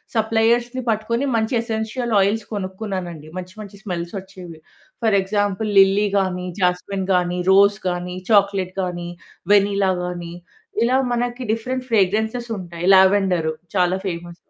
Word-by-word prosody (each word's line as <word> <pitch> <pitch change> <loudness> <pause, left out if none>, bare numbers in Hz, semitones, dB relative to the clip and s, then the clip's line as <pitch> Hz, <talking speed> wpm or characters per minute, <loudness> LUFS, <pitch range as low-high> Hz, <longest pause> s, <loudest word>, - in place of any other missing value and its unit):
సప్లయర్స్‌ని 230 +3 +1
పట్టుకొని 230 +4 0
మంచి 220 +2 0
essential 230 +1 -3
oils 205 +3 0
కొనుక్కున్నానండి. 185 -5 -5
మంచి 185 0 -7
మంచి 200 -1 -11
స్మెల్స్ 170 -3 -4
వచ్చేవి. 185 -4 -12 0.4
ఫర్ 220 -3 +3
ఎగ్జాంపుల్ 205 +2 -1
లిల్లీ 195 +2 +4
గానీ, 180 -1 -2
జాస్మిన్ 185 +2 -1
గానీ, 180 0 +1
రోజ్ 200 +1 +5
గానీ, 180 0 -4 0.2
చాక్లెట్ 195 -3 +2
గానీ, 175 -1 -4 0.4
వెనిల్లా 200 -1 +3
గానీ 175 -1 -6 0.5
ఇలా 250 +2 +3 0.2
మనకి 245 +1 -2
డిఫరెంట్ 255 +3 -4
ఫ్రేగ్రెన్సెస్ 220 +4 +1
ఉంటాయి. 175 -1 -6
లావెండర్ 190 -4 +3 0.3
చాలా 180 -1 +2
ఫేమస్. 175 -2 -5
195 Hz, 125 wpm, -21 LUFS, 180-220 Hz, 0.5 s, రోజ్